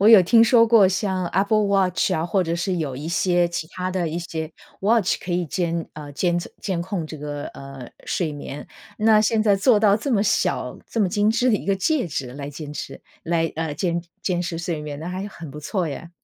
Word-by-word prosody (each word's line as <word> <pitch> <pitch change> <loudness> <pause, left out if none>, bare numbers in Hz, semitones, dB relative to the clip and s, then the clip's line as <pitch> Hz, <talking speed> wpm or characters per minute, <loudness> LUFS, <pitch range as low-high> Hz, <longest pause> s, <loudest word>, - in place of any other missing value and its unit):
我 205 - +6
有 220 -4 +10
听 225 +6 +5
说 230 -1 +6
过 220 -5 +6
像 190 -1 -1
Apple 205 +4 +2
Watch 190 -3 +2
啊， 160 +2 0
或 185 +1 +1
者 170 0 -2
是 180 +1 -1
有 140 -5 -3
一 150 +3 -6
些 175 +1 +2
其 170 -2 -4
它 185 0 -3
的 175 -3 -1
一 165 +2 -3
些 160 -2 -5 0.3
watch 215 -1 +3
可 180 - -6
以 175 -1 0
监 170 0 -2
呃 150 -1 -9
监 175 +4 +1
测 175 - -4
监 180 -4 -2
控 180 -3 -3
这 155 - -8
个， 145 0 -5
呃， 135 -2 -9 0.2
睡 160 -4 -1
眠， 145 0 -7 0.3
那 215 0 +5
现 220 0 +2
在 210 -2 +4
做 210 +3 +4
到 205 -1 +4
这 275 +5 -4
么 210 -5 +3
小、 210 - 0
这 230 - -5
么 195 - +3
精 205 +3 +2
致 245 +3 +2
的 220 - +4
一 - - -2
个 195 -1 +1
戒 260 - 0
指 130 -4 -4
来 140 +1 -6
坚 150 0 -8
持 135 -2 -7 0.2
来， 165 -1 0
呃， 160 -1 -2
监 170 +2 -1 0.2
监 175 -2 -1
视 165 -1 -4
睡 170 -3 -3
眠， 145 -1 -6
那 165 +3 -6
还 185 +1 -4
是 205 - -5
很 165 -6 -10
不 150 +2 -9
错 180 +3 -1
耶。 160 +3 -6
175 Hz, 295 characters per minute, -23 LUFS, 160-200 Hz, 0.3 s, 有